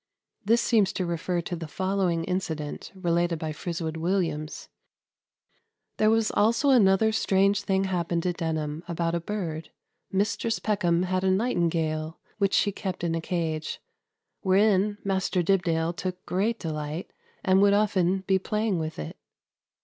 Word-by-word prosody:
This 230 +3 +3
seems 215 -5 +3
to 185 - -1
refer 170 +1 -1
to 175 - -4
the 165 -1 -6
following 185 -1 0
incident 160 -5 -3
related 175 -2 0
by 155 0 -4
Friswood 160 0 -4
Williams: 160 -3 -2 1.3
"There 215 - +4
was 225 -1 +2
also 230 +6 +3
another 220 -3 +5
strange 200 -1 +2
thing 195 -1 +1
happened 175 -2 -1
at 180 -1 -1
Denham 160 -2 -2
about 170 -1 -1
a 170 - +1
bird. 165 -4 -4 0.4
Mistris 210 +3 0
Peckham 180 -5 +1
had 185 0 -1
a 190 - +3
nightingale, 165 -6 0 0.2
which 200 -1 +2
she 205 - +3
kept 190 -3 -5
in 170 -1 0
a 165 - -1
cage, 160 -2 -2 0.6
wherein 200 +1 +3
Maister 190 -2 0
Dibdale 170 -2 +1
took 180 +1 -5
great 215 +5 0
delight, 155 -1 -5 0.3
and 190 +1 +5
would 200 0 +5
often 195 -3 +2
be 190 0 +3
playing 210 -1 -1
with 160 0 -4
it. 75 - -6
185 Hz, 145 wpm, -27 LUFS, 165-200 Hz, 1.3 s, another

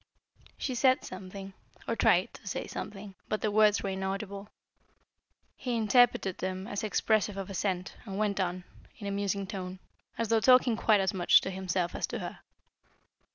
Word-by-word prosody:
She 260 - -2
said 255 +1 +3
something, 195 +1 -8 0.3
or - - 0
tried - - +3
to - - -13
say - - -3
something, 200 -1 -7 0.2
but 215 - -1
the 215 - 0
words 210 0 +4
were 195 - -1
inaudible; 195 +1 -4 1.1
he 245 -3 -2
interpreted 225 -4 +3
them 185 0 -3
as 205 -2 -3
expressive 215 -1 +1
of 195 0 -5
assent, 185 -1 -2
and 195 -3 -5
went 205 -1 0
on, 180 -1 -1 0.3
in 205 - -8
a 200 - -2
musing 200 0 -1
tone, 185 -2 -6 0.4
as 230 -2 -1
though 225 -1 +4
talking 250 0 +5
quite 215 -2 +3
as 190 - 0
much 180 -2 +6
to 190 - -4
himself 185 -2 -1
as - - -2
to - - -4
her. - - -6
200 Hz, 170 wpm, -30 LUFS, 190-215 Hz, 1.1 s, much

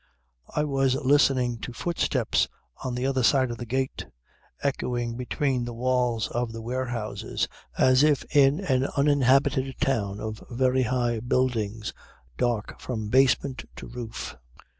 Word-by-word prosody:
"I 150 - +2
was 135 -3 +1
listening 135 -3 +3
to 125 - -6
footsteps 170 +7 0 0.4
on 130 -2 -2
the 125 +1 -1
other 135 -1 +1
side 130 0 +3
of 120 - -6
the 120 - -6
gate, 130 - -2 0.6
echoing 120 -4 -1
between 125 +1 -1
the 120 -1 -5
walls 125 -2 +1
of 120 -1 -2
the 115 - -6
warehouses 120 -2 -2 0.3
as 130 0 +5
if 150 -2 +3
in 140 +2 +5
an 135 -7 +1
uninhabited 135 -1 +3
town 105 -6 0
of 110 -1 -5
very 130 +1 +2
high 120 -1 0
buildings 115 -3 -1 0.4
dark 115 - -1
from 110 -4 -4
basement 130 +1 +3
to - - -8
roof. 115 -1 -6
125 Hz, 140 wpm, -26 LUFS, 120-135 Hz, 0.6 s, as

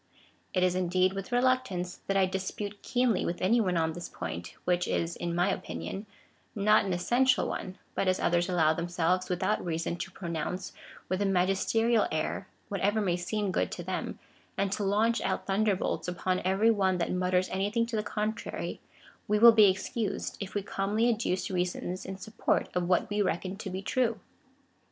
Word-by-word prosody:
It 185 - +3
is, 180 -1 +3
indeed, 185 +1 +2
with 195 +4 -6
reluctance, 245 -8 +1
that 195 - +1
I 190 - +5
dispute 195 +2 -4
keenly 245 -5 +1
with 170 - -2
any 230 +6 +3
one 180 -4 +1
on 160 -1 +1
this 175 +1 -7
point, 85 +2 -6
which 180 0 +1
is 170 0 -1
(in 170 -1 -3
my 175 +3 +2
opinion) 200 +2 -5 0.5
not 210 0 +4
an 195 - -2
essential 250 +9 +2
one; 185 -1 -5 0.2
but 195 - 0
as 185 0 +2
others 175 +1 +2
allow 160 -3 +3
themselves, 175 +2 0
without 185 +4 0
reason, 170 0 -2
to 190 - -5
pronounce, 175 0 -4 0.3
with 185 +1 -1
a - - +2
magisterial 195 +5 +2
air, 155 0 -2 0.2
whatever 205 +2 0
may 185 -5 +1
seem 195 +3 -2
good - - 0
to - - -5
them, - - -3 0.4
and 195 0 0
to 205 - -1
launch 215 +4 +2
out - - -1
thunderbolts 195 -2 0
upon 180 +1 -1
every 195 +5 +3
one 190 -4 +2
that 170 - -1
mutters 180 0 +1
anything 205 +5 0
to 230 0 -4
the 215 - +1
contrary, 215 +1 -3 0.5
we 210 - +2
will 235 +2 +10
be 215 -3 +7
ex 190 +1 -2
cused, 225 -4 -2
if 195 0 -6
we 205 - 0
calmly 210 +5 +1
adduce 195 -4 -2
reasons 180 0 -2
in 190 - -5
support 215 +4 -1
of 180 -1 -1
what 180 - +3
we 205 0 +1
reckon 185 0 -1
to 200 0 -6
be 190 +1 -5
true. 230 -1 0
190 Hz, 185 wpm, -29 LUFS, 180-210 Hz, 0.5 s, will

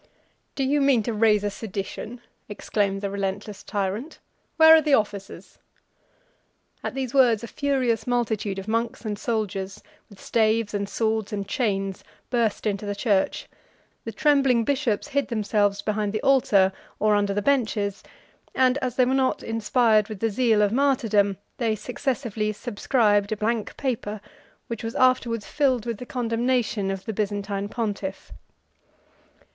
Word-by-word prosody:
"Do 275 - -1
you 285 +2 +2
mean 270 -5 +3
to 230 - -2
raise 210 -1 +3
a 205 - -1
sedition?" 210 +3 -6 0.3
exclaimed 200 -1 -1
the 200 - -2
relentless 200 +1 -4
tyrant. 205 - -3 0.4
"Where 320 -1 +9
are 320 - +5
the 300 -3 +4
officers?" 205 -3 -4 1.2
At - - -4
these 260 -3 -3
words 240 -5 +4
a - - -5
furious 255 -5 0
multitude 220 -5 -1
of 195 +1 -6
monks 230 +2 -2
and 210 -1 -3
soldiers, 195 -4 -3 0.3
with 200 -3 -16
staves, 220 -1 +1
and 200 -1 -2
swords, 220 0 -1
and 200 -2 -3
chains, 195 -5 -1 0.3
burst 230 -4 0
into 205 -1 -1
the 205 - -2
church; 200 -3 0 0.6
the 225 - -5
trembling 270 -1 +3
bishops 260 -4 -1
hid 280 0 0
themselves 205 -3 0
behind 210 -1 -1
the 215 - -2
altar, 205 -8 +4 0.2
or 215 0 +2
under 205 -1 +1
the 205 - -1
benches, 215 -6 0 0.5
and 260 +1 +3
as 250 -3 -3
they 255 - +4
were 255 - +1
not 265 -1 +1
inspired 225 -1 +2
with 215 -3 -7
the 225 +1 0
zeal 220 -1 +3
of 205 - +2
martyrdom, 225 -7 +2 0.2
they 225 -3 +1
successively 230 -1 -2
subscribed 205 -1 +1
a 215 - -1
blank 220 +1 -2
paper, 220 -6 -3 0.5
which 230 0 -6
was 225 0 -4
afterwards 250 -4 +2
filled 260 -6 +1
with 235 -3 -4
the 250 - -8
condemnation 235 -4 0
of 195 0 -4
the 220 - -3
Byzantine 205 -1 -2
pontiff. 205 -4 -4
220 Hz, 150 wpm, -24 LUFS, 205-245 Hz, 1.2 s, Where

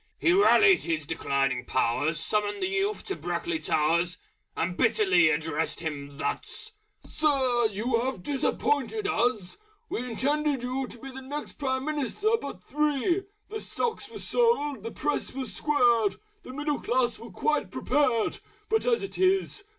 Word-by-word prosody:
He 345 - +3
rallied 400 0 +6
his 160 -3 -2
declining 135 -5 0
powers, 130 +6 0
Summoned 205 +3 -1
the - - +2
youth 400 +2 -1
to 390 - -3
Brackley 345 -2 -2
Towers, 170 - +1 0.4
And 175 +2 -1
bitterly 190 -7 +4
addressed 160 +1 -1
him 145 -3 -5
thus 435 - -4 0.3
"Sir! 260 -6 +2
you 230 +3 0
have 250 -7 -3
disappointed 290 +7 0
us! 225 - 0 0.3
We - - -2
had 250 - -5
intended 285 +1 0
you 255 +1 -2
to 240 - -8
be 270 +3 -9
The 265 +1 -8
next 290 +3 -6
Prime 260 -2 -1
Minister 305 - 0
but 185 -10 -7
three: 300 +6 0 0.2
The 435 +1 -4
stocks 445 -3 -3
were 450 - -9
sold; 295 - +1
the 230 - -5
Press 295 +2 -2
was 265 -1 -3
squared: 240 -8 +3 0.3
The - - -10
Middle 295 +1 -2
Class 240 -2 +1
was 230 0 -11
quite 300 - 0
prepared. 255 -7 +1 0.3
But 445 +2 +1
as 470 -3 +2
it 395 - -6
is!... 385 +2 +1
260 Hz, 155 wpm, -27 LUFS, 205-305 Hz, 0.4 s, rallied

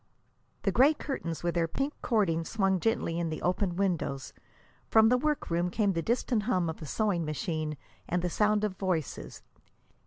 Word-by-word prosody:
The 195 - +2
gray 275 +9 +5
curtains 170 - -4
with 175 -1 0
their 170 -1 +1
pink 275 - -2
cording 190 -8 +1
swung 195 0 +1
gently 200 -6 0
in 170 -1 -1
the 155 - -4
open 180 0 0
windows. 175 -8 -1 0.6
From 220 0 +6
the 250 - +4
work 300 - -1
room 175 +1 +1
came 200 +1 +1
the 165 - -1
distant 235 +2 0
hum 180 -7 +1
of 160 - -12
a 155 - -6
sewing 200 -1 0
machine 155 -1 -3 0.3
and 180 0 0
the - - +1
sound 210 +1 +2
of 210 -3 -1
voices. 180 -7 -3
185 Hz, 180 wpm, -29 LUFS, 165-220 Hz, 0.6 s, From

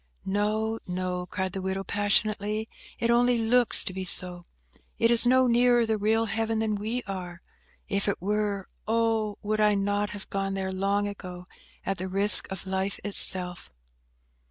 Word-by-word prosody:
"No, 215 +3 -1
no," 180 0 -4
cried 185 0 -4
the 190 - -4
widow, 190 +1 -3
passionately; 210 +1 0 0.3
"it 235 0 0
only 245 +1 +3
looks 235 +1 +3
to 185 - -5
be 190 0 -5
so. 180 -1 -1 0.5
It 230 +1 +2
is 235 +1 +3
no 260 +1 +4
nearer 240 0 +3
the 220 0 0
real 220 +2 +1
Heaven 225 +1 -2
than 220 -1 -1
we 220 +4 -3
are. 180 -3 -7 0.4
If 200 +1 -1
it 200 - -1
were, 205 0 -2 0.2
oh! 225 -2 0
would 215 +1 -2
I 210 -1 +3
not 205 +1 -1
have 205 -2 -8
gone 195 0 -2
there 190 -1 -3
long 200 +2 -1
ago, 180 -3 -8 0.4
at 195 -2 -2
the 185 - -4
risk 195 +2 +5
of 190 -1 -7
life 190 +1 -3
itself!" 185 -3 +4
205 Hz, 165 wpm, -26 LUFS, 190-220 Hz, 0.5 s, risk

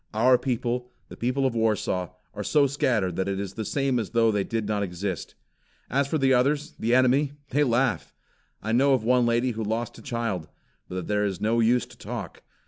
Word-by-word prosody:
Our 125 +3 +5
people, 125 0 -2 0.2
the - - -9
people 130 +3 0
of 130 - +1
Warsaw, 105 -5 0 0.2
are 105 0 -5
so 145 +6 +3
scattered, 120 -10 0
that 95 - 0
it 100 0 -2
is 100 -1 -4
the 110 - -4
same 135 +1 0
as 110 - -3
though 115 -1 +3
they 105 -2 0
did 115 -1 -3
not 105 -1 0
exist. 95 -1 -4 0.6
As 140 +1 +2
for 155 - 0
the 135 -2 +3
others, 140 +4 +1
the 115 +2 +2
enemy, 130 +3 +3 0.2
they 145 +3 +3
laugh. 125 -2 +1 0.5
I 110 - -2
know 135 +4 +4
of 120 - -2
one 125 +1 +3
lady 120 +2 +2
who 110 -1 -4
lost 110 +2 -3
a - - -12
child 115 -9 -3 0.4
But 90 -1 -4
there 105 0 0
is 95 -4 -2
no 115 +2 +1
use 120 0 +3
to - - -17
talk. - - -6
115 Hz, 210 wpm, -26 LUFS, 105-130 Hz, 0.6 s, Our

